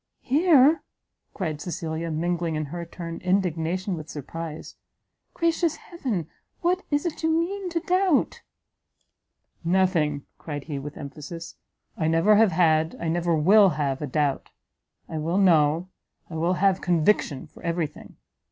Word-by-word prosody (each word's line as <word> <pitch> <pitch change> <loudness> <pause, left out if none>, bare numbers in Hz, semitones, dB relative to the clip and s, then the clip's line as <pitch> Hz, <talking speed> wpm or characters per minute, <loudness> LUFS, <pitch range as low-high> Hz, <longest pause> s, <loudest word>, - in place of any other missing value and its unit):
"Here!" 300 +1 +5 0.5
cried 155 -6 -3
Cecilia, 165 -1 -4
mingling, 170 +1 -1
in 155 0 -2
her 170 -1 -5
turn, 170 -1 -7
indignation 185 0 0
with 155 -1 -8
surprise, 155 +2 -7 0.6
"gracious 335 -1 +1
heaven! 240 - -4 0.3
what 360 +2 +1
is 290 +1 0
it 340 - -3
you 320 - +1
mean 360 +4 0
to 335 -1 -1
doubt?" 365 -4 +1 1.2
"Nothing!" 170 -5 +1
cried 145 -3 -5
he, 145 -2 -5
with 145 +2 -8
emphasis, 150 +4 -8 0.4
"I 160 - -1
never 165 +6 +4
have 220 -3 +5
had, 160 -2 +3
I 165 - -2
never 170 0 +1
will 195 +6 +6
have 140 -2 -1
a 150 - -2
doubt! 145 0 -1 0.6
I 160 - -4
will 165 +4 -1
know, 165 -2 +3 0.4
I - - -6
will 170 +3 +1
have 190 0 +2
conviction 170 -4 +1
for - - -17
every 170 -1 0
thing! 150 - -12
170 Hz, 145 wpm, -25 LUFS, 155-210 Hz, 1.2 s, will